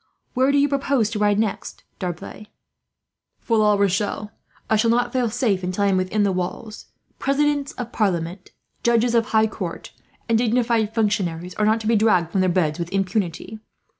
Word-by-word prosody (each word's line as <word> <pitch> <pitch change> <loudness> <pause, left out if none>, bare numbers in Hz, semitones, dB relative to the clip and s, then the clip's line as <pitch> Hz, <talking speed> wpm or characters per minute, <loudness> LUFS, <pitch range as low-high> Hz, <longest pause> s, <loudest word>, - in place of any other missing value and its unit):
"Where 260 +2 +3
do 285 - +2
you 285 0 +4
propose 275 -5 0
to 215 - -3
ride 205 -1 +2
next, 215 -2 -3 0.2
D'Arblay?" 180 +3 -6 0.9
"For 230 -2 0
La 210 -1 +4
Rochelle. 200 +1 -1 0.4
I 220 - +2
shall 225 +2 +2
not 240 +1 +1
feel 250 -3 +1
safe 215 -5 0
until 185 +2 -2
I 200 - +3
am 190 - +2
within 185 +3 0
the 200 - +2
walls. 185 +4 -5 0.3
Presidents 285 0 0
of 245 -2 -6
Parliament, 180 -3 -2 0.3
judges 235 0 +2
of 230 -1 +2
High 220 0 +3
Court, 190 -5 -6 0.4
and 230 -2 +2
dignified 230 -2 +1
functionaries 185 -6 -1
are 210 - 0
not 220 +1 +2
to 215 - -4
be 230 - +3
dragged 185 -6 +2
from 190 - +1
their 185 - +2
beds 170 -3 0
with 170 0 -4
impunity. 195 +1 -2
215 Hz, 180 wpm, -22 LUFS, 185-235 Hz, 0.9 s, you